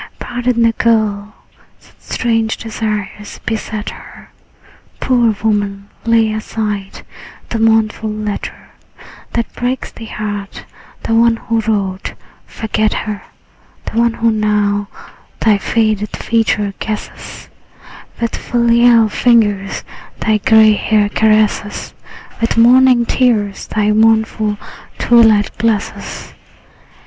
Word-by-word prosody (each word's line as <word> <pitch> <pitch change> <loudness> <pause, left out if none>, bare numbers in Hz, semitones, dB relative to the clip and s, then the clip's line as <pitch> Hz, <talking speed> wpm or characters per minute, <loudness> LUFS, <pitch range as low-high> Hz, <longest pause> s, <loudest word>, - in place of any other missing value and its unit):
Pardon 245 -1 -1
the 230 - +4
girl; 215 -3 0 0.5
such - - -23
strange 225 -2 -1
desires 210 -2 -5
beset 215 -1 -3
her. - - -14 0.7
Poor 245 -3 +2
woman, 205 -2 -1 0.2
lay 225 -1 +3
aside 210 -2 -4 0.5
the 230 - -2
mournful 220 -1 +2
letter 210 -1 -5 0.6
That 235 -1 -2
breaks 250 +2 -3
thy 230 - -10
heart; 205 -2 -6 0.4
the 225 - -1
one 230 0 +4
who 230 0 -2
wrote, 200 -4 -2 0.3
forget 215 -1 -1
her: 210 -2 -4 0.6
The 225 - -2
one 235 0 +2
who 230 0 +1
now 210 -1 0 0.5
thy 215 -2 +3
faded 215 -1 0
features 220 -3 0
guesses, 215 -1 -6 0.7
With 230 -1 -2
filial 235 -1 +3
fingers 210 -4 +1 0.4
thy 215 -1 +1
gray 220 0 +5
hair 210 0 +1
caresses, 215 -1 +1 0.5
With 230 0 0
morning 250 +1 +5
tears 220 -6 0
thy 210 -1 0
mournful 220 -1 +2 0.4
twilight 225 -4 +4
blesses. 220 -2 -2
220 Hz, 105 wpm, -15 LUFS, 210-230 Hz, 0.7 s, gray